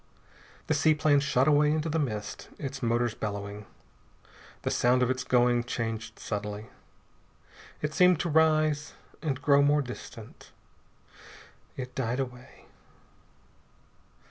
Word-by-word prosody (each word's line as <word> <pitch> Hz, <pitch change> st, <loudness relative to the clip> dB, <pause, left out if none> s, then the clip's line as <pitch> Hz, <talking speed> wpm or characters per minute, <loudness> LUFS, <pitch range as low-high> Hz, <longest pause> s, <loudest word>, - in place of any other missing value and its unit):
The -, -, +1 dB
seaplane 150 Hz, -1 st, +3 dB
shot 135 Hz, -1 st, +2 dB
away 150 Hz, 0 st, +4 dB
into 155 Hz, +1 st, 0 dB
the 160 Hz, +1 st, 0 dB
mist, 110 Hz, -8 st, -4 dB
its 135 Hz, -1 st, -6 dB
motors 120 Hz, -1 st, +1 dB
bellowing. 100 Hz, -1 st, -5 dB, 1.0 s
The -, -, -1 dB
sound 125 Hz, +1 st, +3 dB
of 125 Hz, -, +2 dB
its 130 Hz, 0 st, -2 dB
going 120 Hz, -1 st, +3 dB
changed 115 Hz, -2 st, -4 dB
subtly. 105 Hz, 0 st, -5 dB, 1.1 s
It 150 Hz, 0 st, -1 dB
seemed 180 Hz, -2 st, +5 dB
to 175 Hz, -, -2 dB
rise, 155 Hz, -1 st, +2 dB, 0.3 s
and 145 Hz, -5 st, -2 dB
grow 140 Hz, 0 st, +4 dB
more 145 Hz, +1 st, +3 dB
distant.... 120 Hz, -3 st, -10 dB, 1.3 s
It 130 Hz, -1 st, -6 dB
died 125 Hz, 0 st, -2 dB
away. 125 Hz, -1 st, -7 dB
130 Hz, 115 wpm, -28 LUFS, 115-150 Hz, 1.3 s, seemed